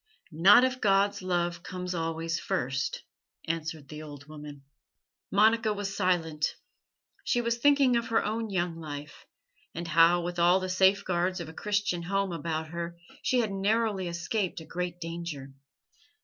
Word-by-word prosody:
"Not 195 +10 +7
if 260 0 0
God's 200 0 +3
love 175 -2 -1
comes 180 +1 -5
always 165 0 -2
first," 135 +2 -2 0.4
answered 160 -2 -3
the 150 +1 -8
old 145 -2 -10
woman. 150 -2 -10 0.7
Monica 220 +2 +4
was 200 -1 -4
silent. 160 -4 0 0.7
She 245 - +1
was 235 0 -1
thinking 280 -2 +4
of 235 -1 0
her 225 - +1
own 220 +1 -2
young 175 -3 -1
life, 145 -2 -8 0.5
and 170 +1 -4
how, 165 +2 +5
with 175 0 -4
all 175 +2 +5
the 185 0 -4
safeguards 185 -1 +2
of 170 -2 -6
a - - -10
Christian 205 -2 -1
home 195 +2 -1
about 160 -1 -3
her, 170 +1 -5 0.2
she 250 -1 +2
had 220 -3 -2
narrowly 200 -1 0
escaped 175 +3 -2
a 160 - -10
great 175 +1 -4
danger. 165 -5 -6
175 Hz, 150 wpm, -29 LUFS, 165-200 Hz, 0.7 s, Not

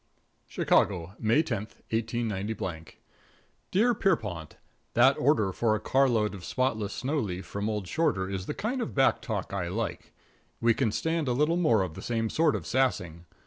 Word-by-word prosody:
| - - -43 0.2
+ - - -44
+ - - -41
XIII - - -3
CHICAGO, 90 -1 +2
May 115 +8 +3
10, 105 -8 -3 0.2
189 110 -6 -2 0.9
Dear 230 +6 +3
Pierrepont: 105 - -1 0.4
That 130 +3 +6
order 115 -8 +3
for 110 +3 +1
a - - -2
carload 115 -3 +2
of 95 -3 -9
Spotless 110 -3 -1
Snow 145 +4 -1
Leaf 95 -6 -4
from 100 +2 -3
old 105 -4 -3
Shorter 95 - 0
is 95 -1 -4
the 150 - -3
kind 245 +4 -2
of 230 - -4
back 135 -1 +3
talk 100 -5 -4
I 95 -3 -2
like. 110 +5 -4 0.5
We 115 0 +4
can 115 -2 0
stand 160 +5 -1
a 125 - +2
little 150 +6 +2
more 120 - +3
of 90 -4 -5
the - - -9
same 115 -2 -1
sort 160 -2 +3
of - - -4
sassing. 90 -11 0
110 Hz, 185 wpm, -28 LUFS, 100-135 Hz, 0.9 s, That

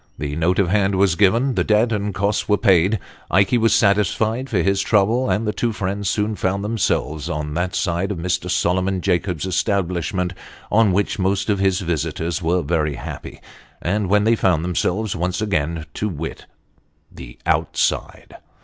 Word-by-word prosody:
The 75 -1 -4
note 85 +3 +1
of 95 -4 +2
hand 100 0 +2
was 95 -2 +3
given 115 +9 +3
the 90 -6 +1
debt 110 +4 +2
and 105 -1 -1
costs 100 +2 -1
were 105 - +4
paid 95 0 +3 0.3
Ikey 100 +7 +3
was 115 0 +3
satisfied 110 +5 +1
for 95 -8 +1
his 100 +1 +2
trouble, 110 +6 +2
and 110 - 0
the 105 - -1
two 120 - -1
friends 100 -1 -2
soon 105 +1 0
found 100 +1 -1
themselves 85 -8 -1
on 75 -2 -3
that 90 +3 -2
side 90 +1 -1
of 100 - -3
Mr. 90 +1 -2
Solomon 90 +1 0
Jacobs's 90 -1 -1
establishment, 90 -2 -1 0.4
on 110 -1 +4
which 100 +2 0
most 95 +2 +1
of 100 - 0
his 95 -1 +1
visitors 85 -1 -2
were 85 +1 +1
very 75 -1 0
happy - - -8 0.4
when 105 +2 +1
they 115 +2 +3
found 90 -7 +1
themselves 95 +4 -1
once 90 +1 -2
again 85 -6 -1
to 105 - -2
wit, 80 -2 -6 0.6
the - - -11
on/side. - - -1
95 Hz, 165 wpm, -21 LUFS, 85-105 Hz, 0.6 s, were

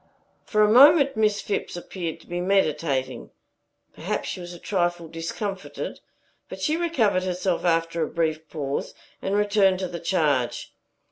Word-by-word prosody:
For 215 -1 +2
a - - +5
moment 280 +2 +7
Miss 210 -1 +2
Phipps 205 - -3
appeared 175 -2 -5
to - - -20
be 175 0 -3
meditating. 155 -8 0 0.6
Perhaps - - -3
she - - -5
was 175 0 -8
a 175 - -9
trifle 175 -2 -1
discomfited; 185 +5 -5 0.5
but - - -8
she 310 - +1
recovered 270 - +1
herself 185 -1 -1
after 165 0 +1
a 155 - +1
brief 160 -1 -2
pause, 140 -3 -4 0.3
and 195 - -1
returned 205 -2 +3
to 185 0 -3
the 170 -1 -6
charge. 150 -8 0
180 Hz, 150 wpm, -25 LUFS, 165-205 Hz, 0.6 s, moment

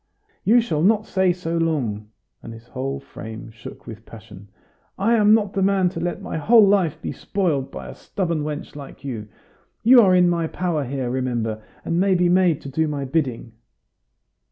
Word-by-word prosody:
"You 235 +4 +5
shall 160 -10 -2
not 210 +4 +3
say 190 -1 +2
so 170 -1 -3
long!" 120 -11 -2 0.3
and 115 - -9
his 115 0 -13
whole 135 +2 -4
frame 110 -4 -10
shook 110 -1 -12
with 110 -1 -10
passion. 105 -3 -13 0.5
"I 220 +5 +2
am 215 -1 +5
not 210 -3 -1
the 195 - -1
man 190 -1 +2
to 170 - -7
let 175 0 -3
my - - -4
whole 220 +7 +6
life 195 -6 +2
be - - -5
spoiled 160 -9 -2
by 65 -2 -8
a - - -8
stubborn 170 -5 -3
wench 150 0 -5
like 140 -1 -11
you! 115 -6 -5 0.6
You 245 +2 +8
are 185 -4 +4
in 180 -1 +5
my 170 -2 0
power 165 -4 -2
here, 130 -1 -3
remember, 120 -4 -2 0.2
and 170 - 0
may 190 0 +3
be 175 0 +2
made 180 -4 +3
to 140 - -8
do 160 +4 0
my 145 -2 -3
bidding." 130 -5 -2
160 Hz, 190 wpm, -22 LUFS, 130-190 Hz, 0.6 s, You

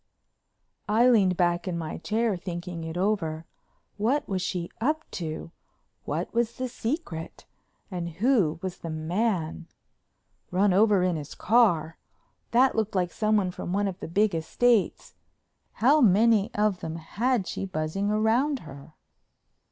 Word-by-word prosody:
I 230 +4 +4
leaned 195 -7 +4
back 175 0 +1
in 175 -2 -2
my 160 -2 -5
chair 220 +3 0
thinking 175 -1 -6
it 160 +1 -5
over. 170 -5 -1 0.5
What 245 +8 0
was 190 -2 -2
she 175 -1 -3
up 310 +6 +1
to? 165 -1 -5 0.5
What - - -3
was 235 0 +1
the 255 - -2
secret? 230 - -5 0.5
And 175 -2 -3
who 205 - +2
was 185 -1 -5
the 165 - -6
man? 165 +1 -2 0.8
"Run 190 +2 +2
over 205 -1 +4
in 180 -3 +1
his 150 -1 -8
car"—that 230 +4 +1
looked 220 -2 -1
like 180 -2 +1
someone 215 -4 +1
from 175 - -5
one 200 +1 +1
of 185 -2 -5
the - - -6
big 200 +4 +2
estates. 215 +7 +1 0.6
How 285 +7 +4
many 215 -1 +4
of 210 -3 +1
them 160 0 -5
had 210 +7 -1
she 195 - -4
buzzing 180 +4 -2
round 230 +7 +1
her? 140 0 -12
195 Hz, 140 wpm, -27 LUFS, 170-225 Hz, 0.8 s, I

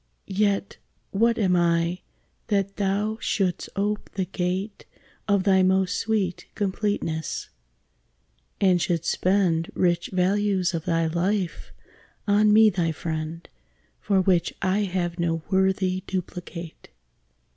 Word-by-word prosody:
Yet 200 0 0 0.3
what 230 +3 +2
am 190 -4 +2
I 170 0 +1 0.5
that 200 -2 0
thou 205 +2 0
shouldst 185 -4 -1
ope 205 +2 -1
the 190 -1 0
gate 185 +3 -3 0.4
Of 200 -2 +2
thy 190 -1 +4
most 190 0 +2
sweet 205 -6 -1
completeness; 190 -5 -2 1.1
and 185 -3 +3
should 170 -1 0
spend 180 -3 +1
Rich 175 -1 +1
values 190 0 +1
of 165 -1 -3
thy 165 -2 +1
life 175 +3 -1 0.6
on 210 +1 +4
me 215 0 +7
thy 170 -3 0
friend, 160 +1 -5 0.5
For 195 -2 +1
which 180 -2 +1
I 195 +2 +1
have 175 -2 -2
no 165 -2 0
worthy 190 -1 +2
duplicate! 175 -2 -6
185 Hz, 115 wpm, -25 LUFS, 175-200 Hz, 1.1 s, me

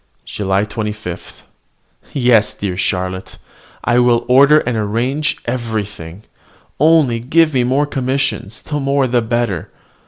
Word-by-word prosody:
JULY 100 0 -1
25. 105 -4 -6 0.7
Yes, 120 -5 +3
dear 95 -3 -3
Charlotte! 95 0 -3 0.5
I 120 0 +2
will 120 -1 +3
order 140 +4 +6
and 125 - -2
arrange 120 +8 -1
everything. 105 -7 -4 0.6
Only 150 -7 +4
give 155 +6 +2
me 125 -2 +2
more 135 +4 +1
commissions, 130 -7 -2
the 150 -1 -3
more 140 0 +1
the 125 -1 +1
better. 115 -6 -2
120 Hz, 120 wpm, -17 LUFS, 105-135 Hz, 0.7 s, order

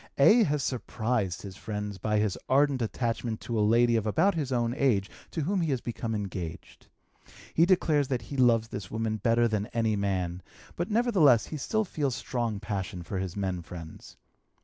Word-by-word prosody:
A. 215 - +7
has 145 -1 0
surprised 115 -6 -2
his 95 -2 -8
friends 105 -1 -5
by 105 +3 0
his 105 -2 +1
ardent 140 -1 +3
attachment 115 0 -2
to 115 -2 -2
a - - +3
lady 115 +3 +4
of 110 -1 0
about 170 - +3
his 150 -6 -2
own 120 -1 +1
age 115 -9 +1 0.2
to 165 - -3
whom 185 +5 0
he 165 - 0
has 130 -3 0
become 115 -1 -4
engaged. 95 -5 -6 0.7
He 165 +2 +4
declares 155 -6 +3
that 125 -4 -2
he 140 - -7
loves 115 -4 +3
this 100 -5 -6
woman 110 -1 -2
better 115 +3 +3
than 105 -2 -1
any 115 -2 0
man, 95 -3 -1 0.3
but 175 - -2
nevertheless 200 - +4
he 155 - -6
still 220 +10 0
feels 145 -8 -2
strong 115 -5 -2
passion 95 -4 -4
for 95 +3 -4
his 95 -2 -4
men 95 -3 -2
friends. 80 -1 -10
115 Hz, 185 wpm, -28 LUFS, 100-140 Hz, 0.7 s, A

